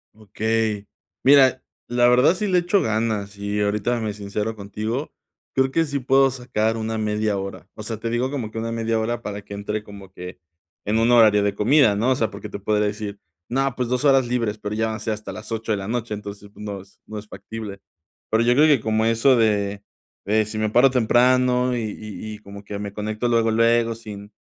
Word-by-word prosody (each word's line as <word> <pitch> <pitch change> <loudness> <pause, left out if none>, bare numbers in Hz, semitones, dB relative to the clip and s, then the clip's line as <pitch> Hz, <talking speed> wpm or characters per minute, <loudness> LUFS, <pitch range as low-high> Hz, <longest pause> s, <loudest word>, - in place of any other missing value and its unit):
Okey, 110 0 -2 0.4
mira, 130 -2 +5 0.2
la 120 0 +3
verdad, 125 +8 +5
sí 210 - -2
le 185 -3 +3
echo 175 +3 +2
ganas 110 -2 -1
y 100 +1 -3
ahorita 105 +4 0
me 110 -2 -3
sincero 105 +2 -4
contigo. 110 +7 -4 0.4
Creo 130 0 +2
que 165 +3 +2
sí 145 -2 -3
puedo 135 +1 +4
sacar 115 -3 -1
una 110 0 -3
media 105 -1 0
hora. 95 -3 -7
O 105 - -9
sea, 110 +1 -5
te 115 +2 -4
digo 120 +2 0
como 125 -6 -4
que 115 - -5
una 115 +1 -3
media 115 -1 -1
hora 120 +1 -2
para 105 0 -5
que 100 0 -9
entre 105 +1 -3
como 100 -2 -12
que 90 0 -9 0.5
en 110 +2 +1
un 115 - +3
horario 110 -4 +6
de 100 0 0
comida, 120 0 +4
¿no?, 115 +6 +1
o - - +3
sea, 115 -3 0
porque 100 +2 -8
te 100 - -6
podría 105 +1 +1
decir: 105 -1 -4 0.3
"No, 135 +1 0
pues, 125 -2 -2
2, 125 +3 0
horas 135 -3 +4
libres", 115 -3 -1
pero 105 0 -4
ya 110 +1 +1
van 110 - -3
a - - -11
ser 110 - -2
hasta 105 0 -7
las 110 +1 -9
8:00, 115 0 -3
de 105 - +1
la 95 - -6
noche, 115 -1 -2
entonces, 105 0 -8
pues, - - -11
no 100 -2 -5
es 95 - -21
no 110 - -7
es 105 0 -8
factible. 100 -1 -8 0.5
Pero, 110 +1 +2
yo 120 - +4
creo 150 +5 +5
que 145 -7 +4
como 110 0 +1
eso 115 +4 +4
de 100 -3 +1 0.4
de 110 +1 +2
si 110 +1 -6
me 110 0 0
paro 125 +5 +5
temprano 125 +1 +3
y 120 - -2
y 110 -1 -6
y - - -10
como 100 -1 -11
que 100 0 -6
me 100 -1 -5
conecto 110 +3 -3
luego 115 -1 +2
luego 115 +1 +3
sin 105 -2 -10
110 Hz, 225 wpm, -22 LUFS, 105-120 Hz, 0.5 s, horario